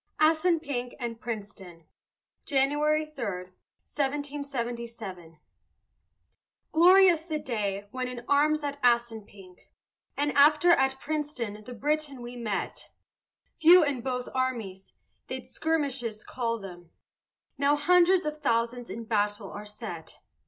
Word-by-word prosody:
ASSUNPINK 310 -6 +1
AND 235 -2 -5
PRINCETON 200 -6 -7 0.6
[January 295 +2 +2
3, 305 -5 -8
1777] 235 - -5 1.3
Glorious 350 0 +6
the 310 -2 -1
day 205 -7 -3
when 255 0 -3
in 245 -1 -7
arms 300 +2 +3
at 285 0 -4
Assunpink, 220 -6 -1 0.5
And 290 +1 +1
after 300 +4 +6
at 265 -4 +3
Princeton 285 -9 -4
the 250 - -8
Briton 290 0 -2
we 240 +1 -8
met; 220 -5 -4 0.7
Few 345 +2 +8
in 285 -4 -1
both 250 0 -3
armies 230 -8 -3 0.3
they'd - - -5
skirmishes 275 -9 -2
call 230 -2 -2
them, 175 -5 -11 0.7
Now 285 +1 +4
hundreds 355 +3 +4
of 300 0 -3
thousands 235 -3 -1
in 230 - -6
battle 205 -2 -1
are 210 +1 -8
set. 205 -6 -8
250 Hz, 110 wpm, -28 LUFS, 220-295 Hz, 1.3 s, Few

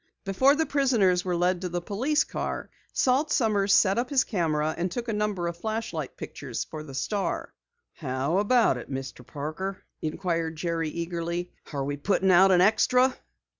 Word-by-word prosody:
Before 260 +9 +4
the 320 +1 +1
prisoners 235 - +2
were 180 -1 -1
led 180 +1 +1
to 180 - -3
the 175 0 -2
police 245 - 0
car, - - -4 0.2
Salt 275 +4 +2
Sommers 205 -5 +2
set 195 +2 +5
up 245 +1 -2
his 275 -3 +3
camera 160 -5 0
and 175 +2 -1
took 240 +5 -4
a 225 - -1
number 210 -4 -1
of 170 0 -4
flashlight 215 - -4
pictures 130 -5 -5
for 155 - -8
the 140 -3 -9
Star. 200 +8 -2 0.4
"How 140 +5 -1
about 220 - +3
it, 120 - -9
Mr. 135 -1 -6
Parker?" 155 +9 -5 0.2
inquired 165 0 -2
Jerry 165 -1 -2
eagerly. 170 +1 -3 0.2
"Are 140 -3 -2
we 145 +1 -3
putting 190 +4 +2
out 190 +2 +7
an 180 -2 +5
extra?" 250 +6 +4
180 Hz, 170 wpm, -27 LUFS, 160-220 Hz, 0.4 s, out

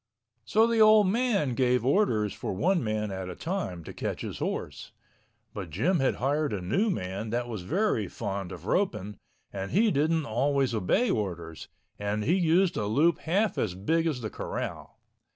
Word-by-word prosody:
So 220 +1 +4
the 230 -1 +2
old 215 -1 +7
man 210 - +1
gave 125 -1 +2
orders 120 - +2
for - - -4
one 175 - +1
man 110 -1 -2
at 95 -1 -5
a 90 - -6
time 160 - -4
to - - -9
catch - - -4
his - - -5
horse—but 95 -5 -7
Jim 150 - +1
had 135 - +2
hired 145 +2 0
a 100 - -2
new 190 - 0
man 100 - -3
that 120 +2 -1
was 110 -5 -5
very 155 - 0
fond 100 -2 -4
of 85 0 -9
roping 105 - -1 0.4
and 100 0 -4
he 215 +3 +3
didn't 155 +2 +1
always 135 +2 +1
obey 110 - +1
orders, 85 -6 -4 0.3
and 105 +1 -1
he 155 - +2
used 180 0 +3
a 105 - -1
loop 155 +9 +3
half 195 +6 0
as 90 -5 -1
big 160 - +1
as 140 -6 -2
the 110 -3 -4
corral. - - -5
125 Hz, 175 wpm, -28 LUFS, -, 0.4 s, old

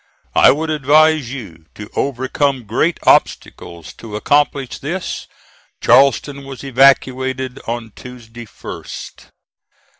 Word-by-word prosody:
I - - +6
would 155 +3 0
advise 155 -2 +3
you 90 -12 -9
to 105 - -9
overcome 135 0 -1
great 140 - 0
obstacles 85 -2 0
to 110 -2 -8
accomplish 140 +3 0
this. 170 +6 -5 0.5
Charleston 140 +1 +3
was 135 -2 -9
evacuated 130 -1 +2
on 115 -1 -4
Tuesday 120 -2 -11
1st. - - -10
130 Hz, 100 wpm, -17 LUFS, 120-140 Hz, 0.5 s, I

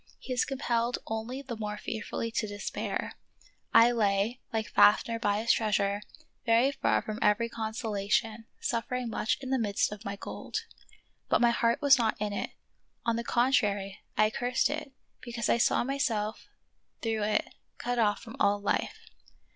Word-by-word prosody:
He 255 - -5
is 245 - +2
compelled 245 -3 0
only 225 +5 -4
the 250 -3 -5
more 210 -1 -4
fearfully 225 +2 -4
to 220 -1 -1
despair. 205 0 -3 0.6
I 235 +1 +7
lay, 215 +1 +1
like 220 -1 -3
Faff 205 - +6
ner 230 -1 -2
by 205 -2 +1
his 230 - +3
treasure, 205 -2 +1 0.8
far - - +2
from 215 0 -5
every 210 +3 +3
consolation, 220 0 -1
suffering 240 +1 -2
much 215 - 0
in 260 -1 -5
the 265 - +2
midst 205 -3 +1
of 210 -1 -8
my 200 0 -4
gold. 435 - -5 0.6
But - - +4
my 240 -1 +5
heart 235 +3 +1
was 275 -2 +7
not 225 -2 +1
in 210 -1 -2
it; - - -2 0.6
on 230 -1 +2
the 235 - -2
contrary, 205 -6 +1 0.2
I 215 0 +4
cursed 245 +4 +1
it, 295 -2 -4 0.3
because 235 -2 -3
I 235 - +3
saw - - +3
myself 230 -5 -1 0.6
through 225 -2 0
it 210 +1 0 0.2
cut 245 0 -2
off 210 -2 +2
from 230 -1 -9
all 205 0 +3
life. 200 - -2
225 Hz, 165 wpm, -29 LUFS, 210-240 Hz, 0.8 s, I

